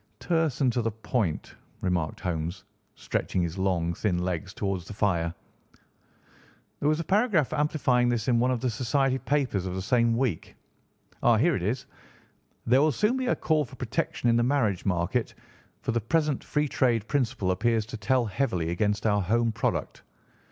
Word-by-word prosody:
"Terse 160 -5 0
and 130 -3 +3
to 120 - +1
the 115 - 0
point," 110 -5 -2 0.3
remarked 85 -4 -1
Holmes, 85 0 -3 0.3
stretching 90 - -2
his 85 +2 -4
long, 90 -3 0
thin 90 0 0
legs 90 +1 -2
towards 95 -3 -3
the - - -7
fire. 85 -6 +1 1.5
"There 145 - +1
was 155 +1 +1
a - - -1
paragraph 195 - +2
amplifying 145 -5 +2
this 120 -3 -1
in 120 -2 +3
one 125 +2 +2
of 125 -3 0
the 130 - +1
society 130 +3 +1
papers 130 -12 0
of 90 - -4
the 95 - -3
same 115 +1 +2
week. 120 -11 -2 0.7
Ah, 120 -2 +5
here 165 +10 +3
it - - -2
is: 115 +8 -2 0.8
'There 125 +3 +4
will 155 +1 +4
soon 210 - +1
be 260 -1 -2
a - - +2
call 155 -2 +1
for 130 -1 -11
protection 125 -1 -2
in 115 0 +4
the - - +3
marriage 120 -8 +1
market, 95 +6 0 0.5
for - - 0
the 115 0 0
present 150 +4 0
free 150 0 0
trade 120 -6 +1
principle 125 -9 0
appears 110 +3 +1
to 120 +3 -7
tell 125 +2 +1
heavily 95 -7 -1
against 105 +4 0
our 105 -2 +3
home 115 +5 +1
product. 115 +1 -2
115 Hz, 180 wpm, -27 LUFS, 95-135 Hz, 1.5 s, Ah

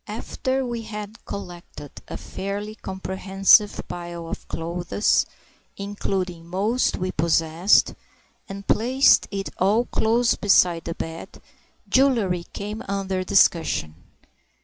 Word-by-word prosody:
After 265 0 -2
we 240 -1 -4
had 210 0 -8
collected 175 -6 -8 0.2
a - - -6
fairly 200 +2 -5
comprehensive 190 +1 +2
pile 175 -1 -7
of - - -7
clothes—including 180 +1 -3
most 205 +8 0
we 185 0 -2
possessed—and 170 +4 0
placed 260 +5 +4
it 195 -1 -4
all 210 +6 +3
close 230 +1 +2
beside 180 -4 +3
the 165 - -4
bed, 165 0 -7 0.5
jewellery 225 -10 +2
came 210 +2 -5
under 195 -1 -2
discussion. 165 - +2
195 Hz, 100 wpm, -23 LUFS, 175-210 Hz, 0.5 s, placed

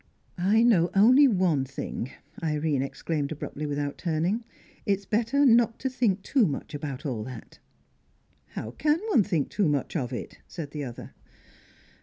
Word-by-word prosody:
"I 205 +6 +4
know 185 -8 +4
only 255 +8 +7
one 180 - +2
thing," 130 -2 -5 0.3
Irene 150 -3 0
exclaimed 145 +1 -3
abruptly, 150 0 -5
without 145 0 -3
turning. 175 +7 0 0.4
"It's 200 -2 0
better 235 +8 +2
not 235 -2 +4
to 265 - -3
think 215 -7 +1
too 255 -8 +3
much 140 0 -5
about 145 0 -5
all 120 -7 -2
that." 125 -3 -10 1.0
"How 110 - -4
can 300 - +1
one 355 - +5
think 170 -8 -1
too 200 -7 +1
much 145 +2 -1
of 130 -6 -1
it?" 120 - -6
said 155 -5 -7
the 150 -1 -4
other. 120 -2 -9
170 Hz, 155 wpm, -27 LUFS, 145-220 Hz, 1.0 s, only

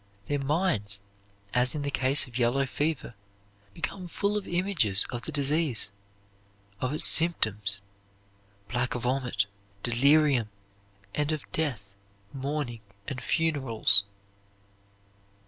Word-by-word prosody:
Their 145 +6 -2
minds 135 - -1 0.5
(as 125 +3 +1
in 145 - -3
the 140 - -2
case 135 +2 +3
of 125 -1 -7
yellow 125 +3 +2
fever) 145 -1 -2 0.6
become 185 -2 -5
full 200 +4 -1
of 210 - -3
images 175 - +3
of 120 -1 -4
the 160 - -6
disease, 145 -6 0 0.9
of 130 - -2
its 150 - +3
symptoms 105 - +5 0.9
black 125 +1 -2
vomit, 125 -3 -1 0.4
delirium, 135 -1 +3 0.6
and 150 +1 -1
of 155 -3 -3
death, 130 -11 -3 0.5
mourning, 135 -4 -4 0.3
and 130 -2 -5
funerals. 130 -11 +3
135 Hz, 110 wpm, -27 LUFS, 120-155 Hz, 0.9 s, symptoms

